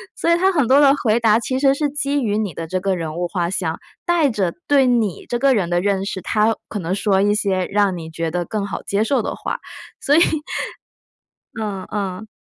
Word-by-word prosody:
所 335 - 0
以 340 - +5
它 380 +2 +3
很 290 -9 +1
多 270 - +6
的 280 -1 +6
回 225 0 +3
答 225 -2 +4
其 260 +2 -2
实 270 -1 +4
是 295 +1 0
基 285 -1 -1
于 210 -2 0
你 210 -4 -1
的 165 - -6
这 185 +3 -2
个 195 0 0
人 160 -3 -4
物 175 - -1
画 175 -1 -2
像， 170 -3 -2 0.3
带 340 -4 +3
着 195 -6 -1 0.2
对 275 -2 +5
你 230 -7 0
这 240 - 0
个 270 +1 +4
人 180 -5 0
的 175 0 +2
认 195 0 0
识， 190 -1 -4
它 215 +4 +1
可 215 - -4
能 180 0 -2
说 195 -1 +2
一 205 0 +3
些 195 -3 0
让 200 -2 +1
你 160 -1 -7
觉 165 0 -3
得 175 +1 -2
更 205 0 -3
好 - - -5
接 200 +1 0
受 270 +5 +1
的 - - -3
话， - - -4 0.4
所 290 - +2
以， 325 - +6 1.4
嗯 195 -3 -4
嗯。 200 0 -4
205 Hz, 245 characters per minute, -20 LUFS, 185-260 Hz, 1.4 s, 多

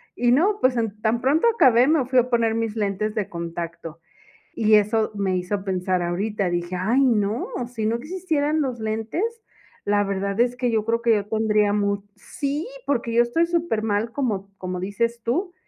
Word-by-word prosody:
Y 245 0 +2
no 390 +10 +3
pues 255 -1 +3
an 215 -2 -2
tan 225 +2 +1
pronto 295 - +3
acabé 255 - +5
me 305 -5 +3
fui 255 0 +3
a 250 +1 +1
poner 230 -2 +2
mis 225 -1 -2
lentes 210 0 -1
de 210 -3 -1
contacto 170 -1 -6 0.5
y 215 -1 +2
eso 215 +1 +2
me 190 -2 0
hizo 190 +2 -3
pensar 185 -1 -1
ahorita, 190 +2 -1
dije: 175 +1 -2
"Ay 215 +9 +2
no, 215 -1 +1 0.2
si 235 -3 -4
no 225 +2 +1
existieran 310 +1 -1
los 255 -4 -2
lentes, 220 - -2 0.6
la 205 0 +2
verdad 200 +1 -2
es 245 0 +1
que 250 -1 0
yo 220 -2 +1
creo 230 +1 0
que 235 -1 +3
ya 205 -2 +1
tendría 210 -1 +1
mu" 200 -1 0
sí 285 - -4 0.2
porque 235 -4 -1
yo 235 +1 +5
estoy 285 +8 +1
supermal 225 -10 -1
como 210 -8 -2
como 185 -1 -4
dices 230 +5 -2
tú, 350 - -1
220 Hz, 185 wpm, -23 LUFS, 200-250 Hz, 0.6 s, acabé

